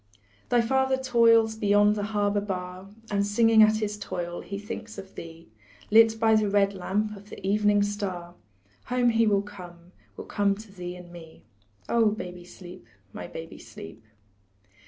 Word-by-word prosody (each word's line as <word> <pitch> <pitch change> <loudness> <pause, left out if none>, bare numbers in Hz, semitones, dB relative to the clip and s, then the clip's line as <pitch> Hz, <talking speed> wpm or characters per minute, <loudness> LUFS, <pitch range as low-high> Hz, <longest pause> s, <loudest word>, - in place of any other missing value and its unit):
Thy 240 -1 +4
father 265 +2 +1
toils 230 -3 +4
beyond 205 -1 +3
the 205 -1 -2
harbor 205 -1 0
bar, 185 -1 -6 0.2
And, 200 -1 +1
singing 220 +2 +4
at 215 0 +6
his 210 -1 -3
toil, 175 -3 -5
he 200 - -6
thinks 215 +2 -8
of 195 0 -10
thee; 165 -3 -11 0.4
Lit 225 0 +6
by 225 0 +4
the 215 -1 +3
red 200 0 +2
lamp 210 +3 -2
of 200 +1 -14
the - - -10
evening 205 0 +3
star 190 -4 -4 0.5
Home 245 -1 +2
will 215 -3 +3
he - - -13
come, 175 -3 -12 0.3
will - - -7
come 200 -1 +1
to 215 0 -13
thee 180 -2 -7
and 180 -1 -12
me, 165 -2 -13 0.4
Oh, 230 -2 +3
baby, 180 -4 -6
sleep, 180 0 -13 0.3
my - - -7
baby, 165 0 -9
sleep. 110 -2 -12
205 Hz, 165 wpm, -26 LUFS, 180-220 Hz, 0.5 s, at